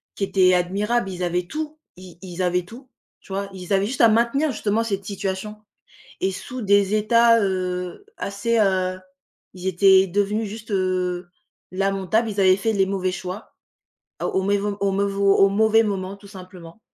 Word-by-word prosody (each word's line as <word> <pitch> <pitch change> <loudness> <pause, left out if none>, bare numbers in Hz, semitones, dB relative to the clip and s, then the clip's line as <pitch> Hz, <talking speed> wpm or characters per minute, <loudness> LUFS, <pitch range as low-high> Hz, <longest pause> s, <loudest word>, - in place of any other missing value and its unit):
qui 195 - -1
était 185 -1 +3
admirable. 195 +5 0
Ils 180 0 -5
avaient 175 0 -1
tout, 310 +3 -5 0.2
i 185 -1 -13
ils 185 -1 -6
avaient 180 0 0
tout, 245 +6 -13 0.3
tu - - -16
vois? 195 +1 -3
Ils 185 0 -9
avaient 195 0 +3
juste 250 +4 -2
à 230 - +7
maintenir, 240 +7 +2
justement, 220 -1 -1
cette 200 -3 -3
situation, 195 +1 -4 0.7
et 190 - +1
sous 250 +6 -7
des 200 0 +3
états, 230 +2 +4
heu, 180 - -3
assez, 205 +4 -1
heu, 185 -2 +1 0.6
ils 185 0 -6
étaient 190 +1 +5
devenus 205 +3 -1
juste, 220 +1 -9
heu, 185 -2 -1 0.4
lamentables. 195 +3 0
Ils 205 -1 -4
avaient 185 -1 +6
fait 220 +3 0
les 195 -1 +2
mauvais 185 -2 -1
choix, 185 +3 -7 0.7
ah - - -1
au 190 - 0
maivau 200 +1 0
au 200 -1 +1
mais 200 +1 +1
vau 200 0 +2
au 195 - +5
mauvais 220 +2 +4
moment, 195 -1 -3
tout 200 0 -16
simplement, 185 -2 -12
195 Hz, 175 wpm, -22 LUFS, 185-215 Hz, 0.7 s, à